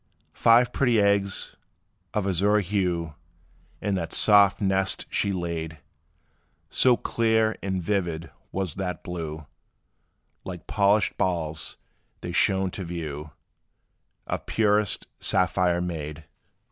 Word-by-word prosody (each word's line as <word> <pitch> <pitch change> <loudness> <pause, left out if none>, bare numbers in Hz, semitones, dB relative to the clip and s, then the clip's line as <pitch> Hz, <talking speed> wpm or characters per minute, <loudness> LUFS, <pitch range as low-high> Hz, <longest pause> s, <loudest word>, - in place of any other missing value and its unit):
Five 120 +2 +4
pretty 120 -5 +2
eggs 100 -1 +1 0.6
of 105 -2 -1
azure 100 +3 +2
hue, 90 -5 -1 0.7
In 100 - -1
that 85 -4 -3
soft 100 -2 +5
nest 95 -1 +2
she 100 - +1
laid. 85 -3 -4 0.9
So 125 -2 +4
clear 110 -1 +1
and 95 -2 -2
vivid 85 -4 -2 0.2
was 95 -5 -3
their 90 -2 -3
blue, 80 -3 -6 1.0
Like 90 -3 -8
polished 105 0 +2
balls 80 -4 -2 0.4
they 85 - -5
shone 95 +1 +2
to 95 - -6
view, 80 -3 -6 1.0
Of - - -4
purest 105 -2 +1
sapphire 90 -1 +1
made. 80 -3 -5
95 Hz, 110 wpm, -25 LUFS, 85-100 Hz, 1.0 s, soft